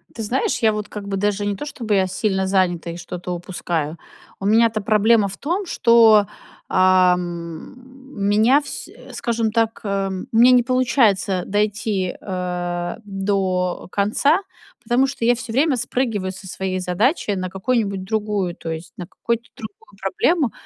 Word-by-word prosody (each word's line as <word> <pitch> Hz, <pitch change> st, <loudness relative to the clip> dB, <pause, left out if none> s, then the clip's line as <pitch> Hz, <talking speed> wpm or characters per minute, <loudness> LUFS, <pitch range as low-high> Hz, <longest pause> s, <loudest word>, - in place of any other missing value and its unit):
Ты 225 Hz, -, -4 dB
знаешь, 245 Hz, +6 st, 0 dB
я 225 Hz, -2 st, +3 dB
вот 210 Hz, -1 st, -4 dB
как 205 Hz, -1 st, -7 dB
бы 195 Hz, -1 st, -2 dB
даже 205 Hz, +1 st, 0 dB
не 205 Hz, 0 st, -1 dB
то, 195 Hz, -, -6 dB
чтобы 230 Hz, -8 st, -2 dB
я 190 Hz, -1 st, +2 dB
сильно 190 Hz, 0 st, -1 dB
занята 180 Hz, -3 st, +1 dB
и 170 Hz, -, -7 dB
что-то 180 Hz, +1 st, -7 dB
упускаю, 170 Hz, -3 st, -3 dB, 0.4 s
у 195 Hz, -, -5 dB
меня-то 220 Hz, +1 st, +3 dB
проблема 215 Hz, 0 st, +3 dB
в 195 Hz, -, -8 dB
том, 355 Hz, +7 st, -2 dB
что, 230 Hz, -7 st, +5 dB, 0.4 s
э, -, -, -9 dB
м, 180 Hz, -2 st, +1 dB, 0.4 s
меня 215 Hz, +8 st, +4 dB
всь 285 Hz, -, -7 dB, 0.2 s
скажем 230 Hz, -3 st, -1 dB
так 225 Hz, 0 st, 0 dB
эм, 195 Hz, -2 st, -2 dB
у 225 Hz, -, 0 dB
меня 245 Hz, +2 st, +7 dB
не 250 Hz, -1 st, +5 dB
получается 230 Hz, -7 st, +2 dB
дойти, 205 Hz, -2 st, -1 dB
э, 180 Hz, -2 st, -3 dB
до 195 Hz, -2 st, -1 dB
конца, 280 Hz, -, +2 dB, 0.4 s
потому 240 Hz, +3 st, +2 dB
что 265 Hz, -4 st, -3 dB
я 245 Hz, +1 st, +4 dB
всё 240 Hz, -1 st, -7 dB
время 280 Hz, +3 st, +3 dB
спрыгиваю 230 Hz, -6 st, -2 dB
со 190 Hz, +1 st, -11 dB
своей 185 Hz, 0 st, -3 dB
задачи 205 Hz, -, 0 dB
на 185 Hz, -2 st, -2 dB
какую-нибудь 195 Hz, 0 st, -1 dB
другую, 205 Hz, -3 st, -2 dB
то 165 Hz, -, -7 dB
есть, 160 Hz, +1 st, -7 dB
на 180 Hz, -, -6 dB
какую-то 235 Hz, +5 st, -3 dB
другую 225 Hz, -, -11 dB
проблему, 345 Hz, -, +1 dB
205 Hz, 160 wpm, -21 LUFS, 185-230 Hz, 0.4 s, меня